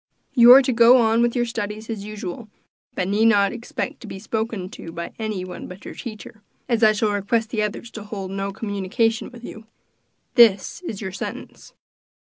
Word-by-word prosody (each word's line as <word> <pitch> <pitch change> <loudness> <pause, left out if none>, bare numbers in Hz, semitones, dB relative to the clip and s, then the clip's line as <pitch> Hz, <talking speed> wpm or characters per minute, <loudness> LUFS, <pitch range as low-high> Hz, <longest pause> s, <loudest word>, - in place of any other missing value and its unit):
You 240 -2 +8
are 270 +1 +8
to 255 - 0
go 235 +2 +7
on 225 -1 +3
with 240 +1 +1
your 240 -1 +1
studies 215 -1 -5
as 220 -3 -5
usual, 210 +1 -7 0.5
but 180 - -1
need 205 +3 +2
not 200 -3 +4
expect 235 0 -5
to 230 - -10
be 195 - -7
spoken 220 -1 -3
to 165 - -9
by 170 +1 -6
any 215 -4 -3
one 180 - -8
but 180 +2 -12
your - - -7
teacher, 220 -2 -9 0.3
as 235 -2 0
I 215 - +7
shall 215 0 0
request 220 +3 -1
the 220 - -1
others 210 +2 -4
to 215 -2 -9
hold 195 -3 -6
no 195 0 -3
communication 205 +2 -1
with 245 -1 -14
you. 220 -1 -10 0.7
This 225 - +4
is 225 - -6
your 190 -3 -4
sentence. 190 - -8
220 Hz, 195 wpm, -22 LUFS, 200-230 Hz, 0.7 s, You